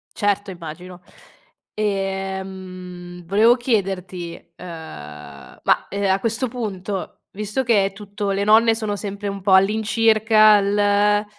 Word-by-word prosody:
Certo, 205 -1 0
immagino. 175 +1 -9 0.7
Ehm, 190 -3 -4
volevo 215 +7 +4
chiederti, 190 -7 -2 0.2
ehm, - - -11 1.0
ma, - - +2
ehm, 200 -1 0
a 190 - +2
questo 230 +4 -1
punto, 205 -5 -5
visto 210 +5 -3
che 220 -5 +3
è 195 - -3
tutto 200 0 -4
le 195 +1 0
nonne 225 +2 +5
sono 215 -2 -2
sempre 200 0 -5
un 200 0 -6
po' 190 0 +2
all'incirca 215 +1 +4
l 205 +1 +2
200 Hz, 120 wpm, -21 LUFS, 190-215 Hz, 1.0 s, nonne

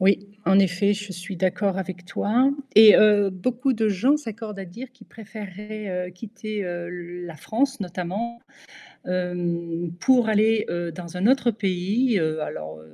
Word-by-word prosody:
Oui, 195 +1 +4 0.3
en 190 +1 +5
effet, 195 +2 +3
je 205 -1 -7
suis 180 +2 -7
d'accord 190 +2 0
avec 185 -1 -6
toi 240 +8 +2 0.2
et 215 0 +10
heu, 210 -2 +5
beaucoup 250 +8 -1
de 220 -1 +1
gens 250 +10 +3
s'accordent 225 -6 -7
à 195 - -5
dire 235 +9 -9
qu'ils 255 - -18
préféreraient 210 -3 -7
quitter, 215 0 -6
heu, 175 -1 -5
le 175 0 -7
la 165 -2 -9
France 250 - -1
notamment, 195 +6 -4 0.7
hem, 175 -2 -2
pour 255 -3 +4
aller, 220 0 +3
heu, 175 -1 -3
dans 170 +1 -9
un 185 +4 +1
autre 250 -2 +3
pays. 205 +4 0
Alors 155 - -3
195 Hz, 155 wpm, -24 LUFS, 180-220 Hz, 0.7 s, et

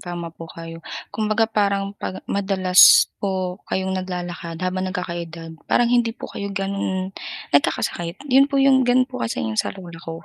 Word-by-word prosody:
tama 175 -2 -6
po 165 0 -10
kayo. 165 0 -9 0.3
Kumbaga 215 +1 +1
parang 200 -2 0
'pag 185 - -5
madalas 190 -2 +6 0.2
po 190 -1 -2
kayong 190 0 -1
naglalakad 180 -2 -4
habang 185 +1 -1
nagkaka-edad, 170 -3 -5 0.2
parang 240 0 +3
hindi 235 -2 +2
po - - -9
kayo 200 - -4
gano'n 195 -1 -2 0.4
nagkakasakit, 170 +4 +1 0.2
yun 275 +2 +6
po 280 - -1
yung 270 -1 +5
gano'n 255 +1 +5
po 255 -1 -8
kasi 225 - -2
'yong 110 -1 +1
sa - - -4
lola 170 -3 -10
ko. 165 0 -8
190 Hz, 165 wpm, -22 LUFS, 170-205 Hz, 0.4 s, madalas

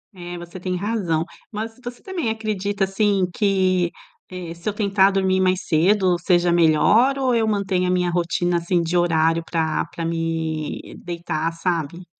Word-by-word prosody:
É, 175 -1 -7
você 175 +2 -9
tem 180 0 -2
razão. 180 -5 -1 0.3
Mas 220 +1 -4
tos 255 - -22
você - - -24
também 360 - -2
acredita 205 -3 -2
assim 195 0 +1
que, 185 -3 +1 0.4
eh, 180 -2 -6
se 170 +4 -4
eu - - -3
tentar 200 -2 +3
dormir 190 -1 +1
mais 185 0 +1
cedo 180 +2 +3
seja 175 0 +2
melhor 185 - +4
ou 260 -2 +1
eu 225 -1 +2
mantenho 195 -3 0
a - - +1
minha 180 -1 +1
rotina 175 0 0
assim 170 +1 0
de 170 +1 -2
horário 165 -1 +2
pra 160 -2 -1
pra 165 - -6
me 165 -2 -3
deitar, 170 -2 -3
sabe? 170 0 -3
180 Hz, 165 wpm, -22 LUFS, 170-200 Hz, 0.4 s, melhor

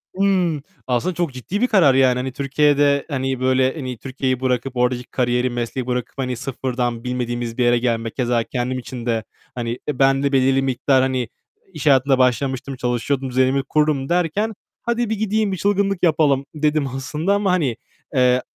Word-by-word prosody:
Hıı. 185 -6 +1 0.3
Aslında 130 +9 0
çok 170 -6 -1
ciddi 185 - -4
bir 250 - +4
karar 170 - +5
yani. 130 -1 +4
Hani, 130 +1 -3
Türkiye'de, 140 +1 +2
hani 135 -2 -2
böyle 130 0 +2
hani, 130 -5 -5
Türkiye'yi 130 0 -2
bırakıp 130 0 -1
oradaki 125 0 +1
kariyeri, 125 0 0
mesleği 120 +1 -3
bırakıp 125 -1 -3
hani 125 -2 -2
sıfırdan 125 -2 -3
bilmediğimiz 120 -2 -3
bir 125 - +2
yere 120 0 +4
gelmek, 115 -2 -1
keza 120 -3 +1
kendim 125 +1 -3
için 125 -1 -7
de, 115 -2 0 0.3
hani, 120 0 -3
ben 135 0 +2
de 140 - +1
belirli 135 0 +3
miktar 130 0 +2
hani 130 -3 -1 0.4
iş 155 -2 -6
hayatında 135 -2 +4
başlamıştım, 130 +1 0
çalışıyordum, 125 +2 -1
düzenimi 130 +2 +2
kurdum 150 -1 0
derken, 180 +6 0 0.3
hadi 235 -1 -1
bir 220 - 0
gideyim, 215 0 0
bir 190 - -2
çılgınlık 200 +1 0
yapalım 145 -5 +3
dedim 150 -1 +1
aslında 150 +8 -2
ama 200 -2 +1
hani, 150 -10 +1 0.4
eee, 125 0 +4
130 Hz, 170 wpm, -21 LUFS, 125-150 Hz, 0.4 s, karar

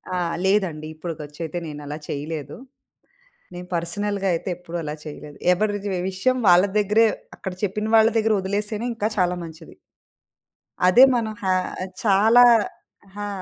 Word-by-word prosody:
ఆ! - - 0 0.3
లేదండి. 185 -6 0
ఇప్పుడుకొచ్చయితే 155 0 -6
నేనలా 150 0 -7
చేయలేదు. 145 -1 -5 1.0
నేను 180 0 -8
పర్సనల్‌గా 195 +3 -1
అయితే, 165 - -4
ఎప్పుడూ 175 -1 -8
అలా 150 0 -4
చేయలేదు. 150 -1 -9 0.2
ఎవ్వరిది 205 +1 -1 0.2
విషయం 255 +8 0
వాళ్ళ 180 +1 +7
దెగ్గరే, 210 +2 +4 0.3
అక్కడ 190 - -6
చెప్పిన 210 +2 -2
వాళ్ళ 220 0 +6
దెగ్గరొదిలేస్తేనే, 210 +1 -1
ఇంకా 215 -1 -1
చాలా 180 0 +2
మంచిది. 160 0 -12 1.1
అదే 215 +8 +7
మనం 220 -2 -1
హ్యా 190 -1 +2 0.3
ఆహ్, 190 - -6
చాలా 220 +4 +5 0.6
అహా! 205 +1 -7
190 Hz, 125 wpm, -23 LUFS, 165-210 Hz, 1.1 s, వాళ్ళ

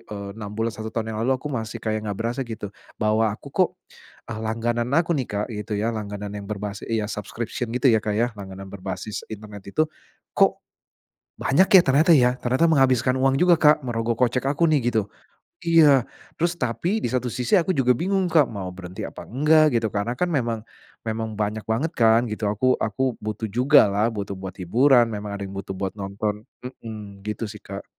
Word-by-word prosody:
eee, 100 -1 -6
6 105 -1 -7
bulan, 115 0 -1
1 110 0 -6
tahun 110 0 -3
yang 110 - -4
lalu 130 +3 +2
aku 145 +3 -6
masih 115 -2 -3
kayak 110 -1 0
enggak 100 - -3
berasa 120 +3 -1
gitu, 110 -5 -5 0.2
bahwa 110 +1 +2
aku 105 - -7
kok, - - +3 0.6
eee, 110 - -5
langganan 115 +2 -1
aku 170 +1 +2
nih 135 -6 -1
Kak 105 +1 -2
gitu 105 0 -4
ya, 115 +3 0
langganan 105 -1 -5
yang 100 -1 -7
berbasi 105 -1 -5
iya 110 -2 0
subscription 110 +3 -4
gitu 125 +1 +3
ya 110 - +4
Kak 105 -1 -2
ya, 120 +2 +1
langganan 95 -2 -9
berbasis 100 +2 -6
internet 105 -2 -9
itu, 155 - +5 0.5
kok - - +2 0.7
banyak 175 +8 +3
ya, 190 -3 +9
ternyata 145 +6 +4
ya. 125 -3 +4
Ternyata 130 +7 +2
menghabiskan 130 -5 +3
uang 135 +1 +2
juga 180 -1 +6
Kak 150 -1 +5
merogoh 115 -1 -1
kocek 125 0 +2
aku 145 +4 +2
nih 140 -6 +2
gitu. 110 -3 0 0.6
Iya 155 -7 +5 0.3
terus 170 +1 +1
tapi 150 - -1
di - - +3
satu 125 -1 0
sisi 125 - 0
aku 175 - -2
juga 125 -2 +4
bingung 190 +9 0
Kak, 155 -5 +5
mau 100 -4 -5
berhenti 90 -1 -7
apa - - -9
enggak 150 +2 +4
gitu. 110 -2 -1
Karena 115 +4 -2
kan 180 - 0
memang 115 -6 -1 0.4
memang 110 -1 -3
banyak 105 +1 -1
banget 135 +9 0
kan 115 0 +4
gitu, 105 -1 -2
aku 125 +5 +2
aku 130 +4 0
butuh 110 +1 -4
juga 130 +3 +6
lah 105 +3 +2
butuh 100 -3 -5
buat 95 -1 -7
hiburan. 120 +7 +4
Memang 105 -1 -4
ada 100 - -5
yang 95 - -8
butuh 95 0 -5
buat 95 0 -3
nonton 105 +2 -3 0.2
mhm 105 -5 -9
gitu 105 +2 -3
sih 105 -1 -10
Kak. 100 +1 -8
115 Hz, 195 wpm, -24 LUFS, 105-130 Hz, 0.7 s, ya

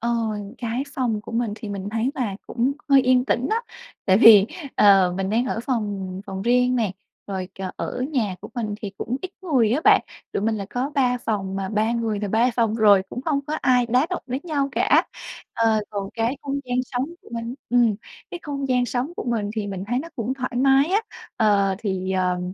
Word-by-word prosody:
Ờ, 235 - -1 0.5
cái 240 +3 -2
phòng 230 -5 -1
của - - -10
mình 230 -2 0
thì 220 - -8
mình 200 0 -4
thấy 225 +3 0
là 225 -7 -2
cũng 255 +3 0 0.2
hơi 275 -1 +7
yên 255 0 +3
tĩnh 250 0 0
đó, 455 +2 +1 0.4
tại 190 0 +5
vì, 210 -3 +9 0.3
ờ, 195 -3 +5
mình 195 0 -1
đang 235 +4 +1
ở 230 - -2
phòng 200 -6 -2
phòng 190 -2 -5
riêng 250 +3 +3
nè, 220 -6 0 0.4
rồi, 190 -2 -4
ờ, 185 -1 -3
ở 250 - -4
nhà 215 -9 0
của - - -9
mình 215 -3 -2
thì 205 - -5
cũng 250 +4 -3
ít 370 - -5
người 260 - +2
á 295 +6 +1
bạn, - - +6 0.3
tụi - - -2
mình 220 +1 +1
là 200 -2 -4
có 255 +3 -2
3 250 -2 +2
phòng, 195 -5 -3
mà 195 -1 -3
3 215 +2 +1
người 225 -3 -1
là 205 - -2
3 230 +5 +2
phòng 225 -2 +1
rồi 205 -4 +6
cũng 250 - -5
không 285 -1 0
có 300 - -2
ai 250 -2 +3
đá 250 +5 +2
động 365 - -3
đến 255 +3 -3
nhau 285 -5 -1
cả. - - +3 0.5
Ờ, 225 -2 +2
còn 200 -1 -4
cái 235 +4 -1
không 280 0 -3
gian 250 0 -1
sống 250 +1 -2 0.2
của - - -17
mình 230 +1 -4 0.2
ừm, 235 -4 +3 0.4
cái 350 - -5
không 280 -2 -3
gian 250 -1 +2
sống 250 +6 -2
của - - -4
mình 225 -4 -1
thì 210 -2 -2
mình 190 -1 -4
thấy 245 +2 0
nó 335 +3 -7
cũng 240 +1 -2
thoải 260 -1 -4
mái 270 +1 +5
á, 410 +4 +2 0.4
ờ, 200 -3 +3
thì, 190 -3 -2
ờ, 180 -1 +1
230 Hz, 225 wpm, -23 LUFS, 205-255 Hz, 0.5 s, vì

